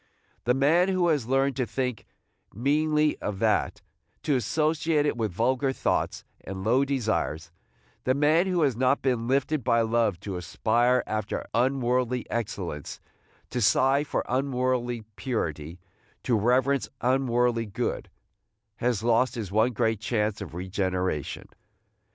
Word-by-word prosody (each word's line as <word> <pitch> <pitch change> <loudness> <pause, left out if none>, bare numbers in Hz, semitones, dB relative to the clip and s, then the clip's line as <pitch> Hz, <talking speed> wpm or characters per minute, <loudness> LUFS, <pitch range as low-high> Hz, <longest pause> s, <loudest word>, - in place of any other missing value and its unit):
The 125 +1 +3
man 160 +7 +4
who 185 -2 +2
has 145 -8 0
learned 135 +1 +1
to 125 -3 0
think 125 -4 -3 0.4
meanly 150 +5 +1
of 105 -2 -4
that, - - 0 0.4
to 145 - +1
associate 150 +4 +1
it 145 - 0
with 110 -4 -2
vulgar 130 +7 +1
thoughts - - -1 0.2
and 95 0 -6
low 125 +6 +3
desires, 110 - -1 0.3
– - - -37
the 130 - +2
man 155 +5 +3
who 180 -3 +1
has 135 -5 +2
not 130 +3 +1
been 125 -3 0
lifted 135 +2 +1
by 115 -1 +3
love 115 -5 +1
to 100 -3 -5
aspire 120 +8 +1
after 110 -1 -3
unworldly 125 0 +1
excellence, 95 - -4 0.5
to 125 - -2
sigh 135 +7 +3
for 150 - -2
unworldly 125 -3 -1
purity, 80 - -3 0.4
to 125 - +1
reverence 125 +5 +2
unworldly 120 -2 +1
good, 100 - -3 0.4
– 110 0 -53
has 120 -3 0
lost 120 +1 +2
his 105 -6 -5
one 110 +4 +3
great 110 -2 0
chance 105 -2 -1
of 95 -4 -7
regeneration. 95 -4 -2
120 Hz, 140 wpm, -26 LUFS, 110-135 Hz, 0.5 s, man